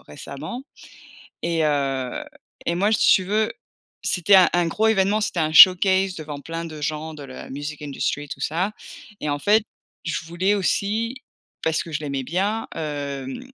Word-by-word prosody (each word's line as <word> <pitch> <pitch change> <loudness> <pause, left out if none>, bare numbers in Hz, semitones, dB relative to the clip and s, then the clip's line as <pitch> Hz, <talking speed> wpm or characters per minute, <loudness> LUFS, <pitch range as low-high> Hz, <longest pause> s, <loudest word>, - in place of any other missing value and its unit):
récemment 155 - -8 0.8
et 165 -1 0
heu 135 -4 -1 0.4
et 170 - +1
moi, 200 +4 +2
si - - +5
tu 185 - +1
veux, 215 +3 0 0.5
c'était 190 +2 +3
un 185 - +8
un 175 -1 +2
gros 215 +7 +1
évènement, 210 0 +2
c'était 210 - -2
un 155 -1 +1
showcase 190 +2 +7
devant 150 -2 -7
plein 165 +3 -5
de 155 -2 -8
gens 155 +1 -3
de 150 - -9
la 130 -2 -9
music 145 +2 -6
industry, 145 0 -3
tout 135 - -7
ça 175 +8 -1 0.5
et 150 - -3
en 145 - 0
fait, 210 +8 +3 0.4
je 170 -2 -3
voulais 175 +5 0
aussi, 220 +6 -1 0.4
parce 160 0 0
que 165 - -10
je 150 - -2
l'aimais 140 -3 -3
bien, 200 - -1
hem, 145 - -5
165 Hz, 170 wpm, -23 LUFS, 145-195 Hz, 0.8 s, un